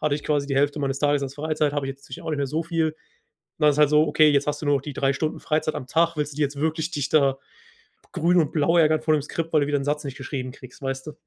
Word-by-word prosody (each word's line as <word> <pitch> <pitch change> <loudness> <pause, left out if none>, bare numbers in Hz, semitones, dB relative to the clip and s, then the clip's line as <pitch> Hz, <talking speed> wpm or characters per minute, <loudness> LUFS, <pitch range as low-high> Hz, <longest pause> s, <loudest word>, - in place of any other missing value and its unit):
Hatte 150 -2 +1
ich 145 - -6
quasi 145 -2 0
die 135 -1 -2
Hälfte 145 +2 +2
meines 135 -1 -1
Tages 145 -1 +2
als 135 0 -5
Freizeit, 155 -1 -1
habe 145 -2 -2
ich - - -2
jetzt 135 0 -12
natürlich 130 - -9
auch 160 - -4
nicht 150 - -2
mehr 140 - 0
so 155 +5 -2
viel. 165 -1 0
Und 155 - -7 0.6
dann 150 -1 +5
ist 145 - 0
es - - -4
halt 150 -1 +5
so: 150 +1 +4
„Okay, 155 -1 +4
jetzt 140 0 +2
hast 150 +1 -2
du - - -3
nur 140 -2 +3
die 145 0 -6
3 135 +1 +1
Stunden 155 +3 -3
Freizeit 155 0 -1
am 130 - -5
Tag, 165 +1 +1
willst 150 0 -2
du 140 - -12
die 155 - 0
jetzt 140 0 -1
wirklich 160 +1 -1
dich 145 -3 -2
da 140 -3 +3 0.7
grün 175 0 +2
und 155 -4 +1
blau 165 +2 +2
ärgern 155 -1 +4
vor 155 -1 +2
dem 150 - +1
Skript, 165 +2 -4
weil 150 -2 +4
du - - 0
wieder 145 -1 +1
'n 135 - -4
Satz 150 +1 -1
nicht 135 -1 -6
geschrieben 130 -2 -5
kriegst,“ 130 -1 -14
weißt 135 +1 -4
du? 150 - -6
150 Hz, 315 wpm, -24 LUFS, 140-155 Hz, 0.7 s, dann